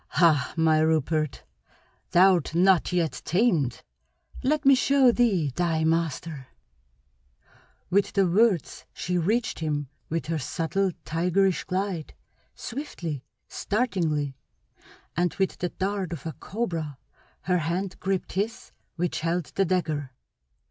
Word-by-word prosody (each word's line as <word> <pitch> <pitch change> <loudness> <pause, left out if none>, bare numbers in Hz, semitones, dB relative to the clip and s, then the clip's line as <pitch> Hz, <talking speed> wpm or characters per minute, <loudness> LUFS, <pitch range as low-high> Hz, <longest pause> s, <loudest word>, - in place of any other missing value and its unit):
"Hah, 155 -5 +3
my 160 -1 +4
Rupert, 155 -1 +1 0.7
thou'rt 180 -3 +4
not 185 0 +4
yet 170 -3 0
tamed. 170 - +1 0.6
Let 300 +3 +1
me 275 - +8
show 270 -1 +5
thee 195 - +2
thy 165 -3 +1
master!" 160 -3 -1 1.4
With 200 +2 +2
the 195 -1 +3
words 195 -2 +1
she 180 0 -1
reached 220 +8 0
him 145 -4 -2 0.2
with 165 +1 -2
her 160 0 -1
subtle, 180 +7 -1 0.2
tigerish 180 +3 +1
glide, 185 -4 -3 0.4
swiftly, 180 - -5 0.2
startlingly, 165 - -1 0.8
and 175 0 0
with 190 -1 -1
the 180 - -1
dart 190 -2 -2
of 165 0 -8
a 160 - -3
cobra 165 - -4 0.4
her 180 -1 +1
hand 175 +4 -2
gripped 190 -1 -2
his 215 +4 -3 0.2
which 175 0 -1
held 165 0 -1
the 195 - +2
dagger. 155 -7 -1
175 Hz, 120 wpm, -26 LUFS, 160-195 Hz, 1.4 s, me